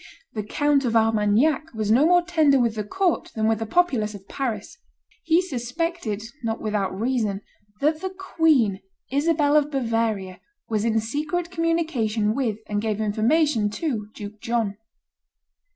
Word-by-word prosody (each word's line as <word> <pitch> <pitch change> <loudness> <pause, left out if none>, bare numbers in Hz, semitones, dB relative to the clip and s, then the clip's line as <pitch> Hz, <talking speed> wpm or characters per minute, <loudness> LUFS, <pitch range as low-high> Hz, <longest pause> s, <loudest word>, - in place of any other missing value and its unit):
The 215 - -2
Count 290 +6 +1
of 235 -3 0
Armagnac 225 +7 +2
was 215 -1 0
no 265 +8 +5
more 355 0 +5
tender 315 -6 +3
with 235 -2 +2
the 215 -1 -3
court 360 - 0
than 220 -1 +1
with 220 -1 +1
the 225 - -3
populace 235 -9 +1
of 195 -1 -12
Paris. 230 -7 -4 0.5
He 330 +2 +3
suspected, 250 - -3 0.2
not 225 -1 -2
without 200 -3 -2
reason, 220 -4 0 0.4
that 310 +2 +1
the 380 - -2
queen, 320 - +2 0.3
Isabel 295 +1 +2
of 295 -1 +4
Bavaria, 225 -8 -1 0.3
was 215 -1 -1
in 225 -1 +2
secret 300 +9 -2
communication 315 -11 0
with 230 -5 -1
and 205 -1 -2
gave 215 -1 -1
information 220 +3 +2
to 230 -7 -2
Duke 210 0 -9
John. 230 -4 -1
235 Hz, 150 wpm, -24 LUFS, 215-310 Hz, 0.5 s, no